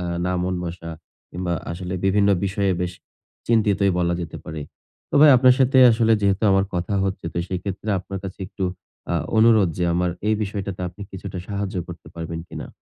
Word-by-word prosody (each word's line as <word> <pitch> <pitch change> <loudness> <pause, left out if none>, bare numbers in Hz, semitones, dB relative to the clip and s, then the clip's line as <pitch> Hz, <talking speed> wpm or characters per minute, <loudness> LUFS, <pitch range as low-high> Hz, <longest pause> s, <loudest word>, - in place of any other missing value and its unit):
আ - - -4 0.2
না 90 - 0
মন 90 +1 -1
বসা 85 -1 -6 0.4
কিংবা 90 0 -3 0.2
আসলে 90 +1 -5
বিভিন্ন 100 +1 +3 0.2
বিষয়ে 100 0 0
বেশ 90 0 -2 0.5
চিন্তিতই 105 -4 +3
বলা 85 0 +1
যেতে 85 - -6
পারে। 80 -1 -6 0.5
তো - - -4
ভাই, 150 -1 +9
আপনার 125 0 +6
সাথে 130 0 +4
আসলে 115 0 +3
যেহেতু 100 +1 +1
আমার 95 0 +3
কথা 90 +4 -1
হচ্ছে, 95 -3 -3
তো 85 - -3
সেইক্ষেত্রে 95 +3 -4
আপনার 95 +2 -6
কাছে 95 +1 -7
একটু 95 - -4 0.5
আ - - +1 0.2
অনুরোধ 110 -4 +5
যে 90 - +1
আমার 90 0 +1 0.2
এই 110 - +3
বিষয়টাতে 100 -2 -4
আপনি 95 +4 -11
কিছুটা 95 -1 -7
সাহায্য 100 -2 -3
করতে 85 - -10
পারবেন 85 0 -5
কিনা? - - -7
95 Hz, 185 wpm, -22 LUFS, 90-105 Hz, 0.5 s, ভাই